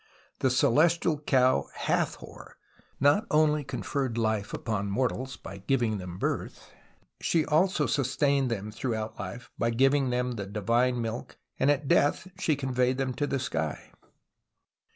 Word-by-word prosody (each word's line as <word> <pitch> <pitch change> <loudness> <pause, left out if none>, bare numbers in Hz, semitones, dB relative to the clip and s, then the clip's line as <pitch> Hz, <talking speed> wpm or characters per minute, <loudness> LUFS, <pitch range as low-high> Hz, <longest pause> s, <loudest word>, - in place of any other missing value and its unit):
The 130 - +2
Celestial 155 +5 +3
Cow 130 -3 +2
Hathor - - -3 0.4
not 145 +11 +3
only 150 -1 +3
conferred 130 -3 -3
life 110 -3 0
upon 105 -3 -2
mortals 130 +4 -1
by 95 +1 -9
giving 110 -1 0
them 90 -1 -7
birth: - - -3 0.5
she 160 -3 +1
also 155 0 +2
sustained 140 0 +1
them 105 -2 -3
through 115 +2 -2
out 110 0 -5
life 120 - -7
by 115 - +2
giving 135 +3 +3
them 125 0 0
the 105 -5 -5
divine 115 +4 +1
milk, 115 +1 -5 0.2
and 135 - +3
at 145 -1 +1
death 145 +6 +2
she 155 -5 +2
conveyed 130 -2 0
them 130 -1 -1
to 145 +3 -1
the 140 - 0
sky. 80 - -3
130 Hz, 145 wpm, -28 LUFS, 115-145 Hz, 0.5 s, Celestial